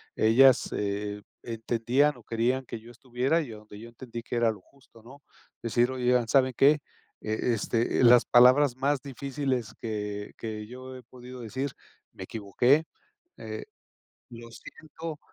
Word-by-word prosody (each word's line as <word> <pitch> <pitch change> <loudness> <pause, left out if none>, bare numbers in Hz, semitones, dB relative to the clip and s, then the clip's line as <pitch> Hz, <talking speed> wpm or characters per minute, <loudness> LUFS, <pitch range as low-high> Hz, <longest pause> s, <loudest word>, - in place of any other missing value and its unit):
ellas, 125 +4 +5
eh, 105 0 -3 0.2
entendían 120 +5 0
o 120 - -16
querían 120 +4 -1
que 115 - -7
yo 115 +2 -15
estuviera 125 +6 -1
y 140 -7 -7
a 110 - -9
donde 105 -1 -13
yo 115 - -10
entendí 120 -1 -9
que 120 - -5
era 120 -1 +3
lo 105 -3 -11
justo, 115 -1 -22
¿no? 130 +4 -13 0.4
Decir, 120 +2 +1
oigan, 125 -2 +1
¿saben 130 +1 +3
qué? 145 +2 +5 0.4
Eh, 110 0 -2 0.2
este, 115 +3 0
las 120 0 +7
palabras 125 +2 +5
más 140 +1 0
difíciles 135 -3 -3
que 105 -2 -5
que 110 -1 -5
yo 130 +3 -10
he 125 - -11
podido 125 +1 -12
decir: 130 +5 -3 0.4
"Me 95 - -9
equivoqué, 120 - +1 0.5
eh, - - -7 0.7
lo 115 0 -10
siento". 155 +5 -9
120 Hz, 155 wpm, -27 LUFS, 115-130 Hz, 0.7 s, las